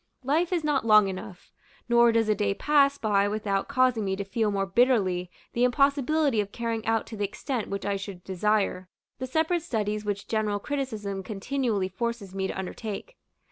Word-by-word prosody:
Life 315 +7 +1
is 345 -3 0
not 295 -3 +1
long 215 -3 +6
enough; 190 0 -8 0.4
nor 235 0 +5
does 225 -1 +2
a 215 - +4
day 200 -1 0
pass 280 +1 +3
by 205 -4 +2
without 205 -2 -1
causing 255 -5 +2
me 190 -1 -1
to 200 - -3
feel 215 +2 0
more 195 -1 0
bitterly 190 -5 +2 0.2
the 240 - +1
impossibility 280 0 +2
of 200 -1 -6
carrying 230 -2 -3
out 225 -1 +1
to 225 - -8
the 205 - -1
extent 225 +3 -3
which 200 0 -4
I 200 -1 0
should 195 -2 -8
desire, 190 -1 0 0.3
the 260 - -3
separate 320 +5 +1
studies 215 -7 -2
which 205 -1 -3
general 215 -2 0
criticism 215 -6 -3
continually 215 0 -1
forces 205 0 -4
me 190 0 -1
to - - -5
undertake. 210 - -6
215 Hz, 180 wpm, -27 LUFS, 200-255 Hz, 0.4 s, long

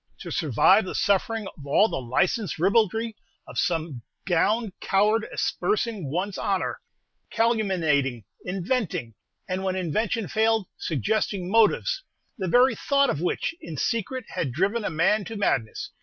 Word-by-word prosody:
To - - -7
survive 185 - +4
the - - -5
suffering 210 +2 +1
of 150 - -13
all 200 +9 +4
the 135 - -3
licensed 175 - 0
ribaldry 220 +5 +2 0.3
of - - -4
some 160 -7 -1 0.2
gowned 200 +4 +1
coward 210 +3 +2
aspersing 230 - -1
one's 185 +6 -2
honor, 195 -2 -1 0.5
calumniating, 170 - +1 0.2
inventing, 180 - -2 0.3
and, 185 +1 -2
when 190 -1 -1
invention 205 +5 -1
failed, 220 -1 +2
suggesting 190 - -1
motives, 225 - +3 0.3
the 190 -7 -3
very 250 +7 +5
thought 280 +3 +2
of 145 - -3
which 180 - -1
in 160 -3 -7
secret 230 - -2
had 135 - -2
driven 195 - 0
a - - -1
man 165 +7 +2
to 225 - -7
madness! 115 - -1
195 Hz, 140 wpm, -25 LUFS, 170-225 Hz, 0.5 s, very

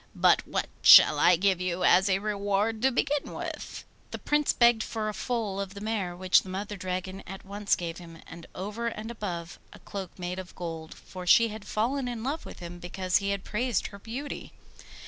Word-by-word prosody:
But - - +4
what - - -1 0.2
shall 150 - +9
I 175 +3 +6
give 185 +1 +1
you 180 0 -2
as 190 +3 +5
a 190 - +3
reward 205 +1 -1
to 265 +1 +3
begin 285 +3 -1
with?' - - -6 0.3
The - - -5
Prince 295 0 +1
begged 235 -2 +4
for 220 -1 -3
a - - -4
foal 215 -4 -2
of 200 0 -6
the - - -7
mare, 205 -4 -2
which 185 +1 +4
the 190 - -11
Mother 200 +2 -4
Dragon 185 0 -4
at 195 +2 -9
once 200 +1 0
gave 170 -1 -5
him, 165 -2 -12
and 170 0 -11
over 210 +5 -4
and 225 0 -5
above, 175 -7 -6
a - - -12
cloak 195 -3 -8
made 180 0 -4
of 185 -1 -9
gold, 165 -2 -6
for 180 -1 -10
she 230 +6 +6
had 215 -1 -8
fallen 250 +6 -1
in 235 -2 -4
love 285 +5 -3
with - - -10
him 175 0 -8
because 185 +1 0
he 200 0 -2
had 200 -1 -2
praised 235 0 -1
her 200 - -9
beauty. 255 +8 -7
200 Hz, 205 wpm, -28 LUFS, 180-225 Hz, 0.3 s, shall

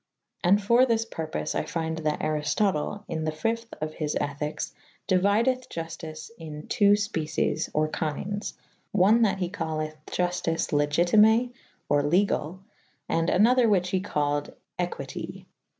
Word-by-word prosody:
And 190 +3 +5
for 235 +5 +4
thys 230 -3 +2
purpofe 160 -6 -4
I - - 0
fynde 160 -1 -3
that 155 -1 -1
Ariftotele 155 +5 0
in 160 - -3
the 155 - 0
.v.°of 225 -3 -3
his 150 -2 -2
ethikes 145 +1 -3 0.4
deuideth 210 +7 +2
Juftice 165 0 -7
in 150 -2 -7
.ii.^ 205 -1 +4
fpeces 200 -7 -1
or 155 0 +1
kyndes/one 200 +5 -1
that 205 -4 +3
he 180 -2 -1
calleth 155 -4 -3
iuftice 175 -2 -1
legitime 180 +11 +4 0.4
or 145 0 +3
legall 175 +2 +1 0.2
/ - - -40
and 165 0 +1
■* - - +2
an 200 +4 +6
other 250 0 +4
whyche 180 -3 +2
he 185 - +1
called 145 -6 -1 0.2
equyte. 175 +2 -5
175 Hz, 135 wpm, -27 LUFS, 155-205 Hz, 0.4 s, an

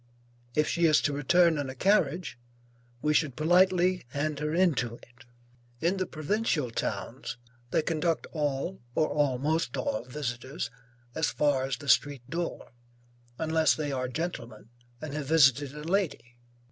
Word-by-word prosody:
If 150 0 +3
she 170 -1 +2
is 155 - +5
to 145 - 0
return 165 +3 +3
in 140 -2 -3
a 130 - -7
carriage, 170 -4 +1 0.6
we 150 - +2
should 150 -4 +1
politely 180 +2 +3
hand 145 +2 -2
her 150 0 -2
into 155 -9 +1
it. 125 +2 -18 0.5
In 175 +6 +1
the 185 - -1
provincial 155 - -1
towns, 120 - -4 0.3
they 155 - +1
conduct 165 +1 0
all 150 +3 -2
or 155 - +2
almost 145 0 0
all 110 - -1
visitors, 125 -2 -4 0.4
as 160 - +1
far 145 -3 +1
as 135 0 -2
the 145 - -11
street 140 -3 +2
door, 170 -5 -4 0.7
unless 160 0 +2
they 150 -2 -3
are 130 -1 -1
gentlemen 125 -7 -5 0.3
and 150 0 -6
have 150 -2 -4
visited 145 -2 +4
a 150 - -7
lady. 165 -9 -1
150 Hz, 145 wpm, -28 LUFS, 135-165 Hz, 0.7 s, is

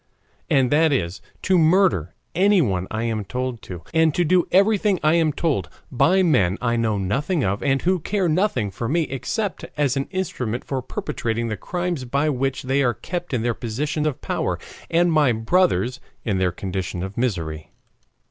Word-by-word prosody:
and 130 -2 +3
that 155 +1 +4
is, 90 -8 -1 0.2
to 185 -2 +3
murder 160 - +3 0.2
anyone 160 - +2
I 110 +1 -3
am 110 -2 -1
told 125 +3 -4
to, 90 -3 -8
and 160 -2 +3
to 175 - +2
do 180 +2 +3
everything 200 0 +3
I 155 +1 +4
am 165 -2 +3
told 135 - -1 0.2
by 185 +9 +3
men 105 - +3
I 120 -1 0
know 115 -3 +1
nothing 135 - 0
of, 100 +2 -1
and 135 -1 +1
who 185 +1 +2
care 190 +3 0
nothing 160 - +1
for 115 +5 -4
me 165 +3 +2
except 155 - -3
as 145 -3 +1
an 135 0 -1
instrument 130 - -3
for 135 -2 -2
perpetrating 115 -2 -3
the 110 - -2
crimes 175 - -3
by 140 +5 +1
which 135 -1 -1
they 135 +2 +1
are 120 -3 +2
kept 175 -1 -5
in 120 -4 0
their 120 0 +1
position 145 +7 -2
of 145 - -3
power, - - -1 0.3
and 170 0 +3
my 150 -5 +4
brothers 130 +1 +1 0.3
in 100 -5 0
their 90 -1 +2
condition 90 -1 -4
of 95 +1 -6
misery. 80 -10 -2
135 Hz, 180 wpm, -22 LUFS, 110-170 Hz, 0.3 s, that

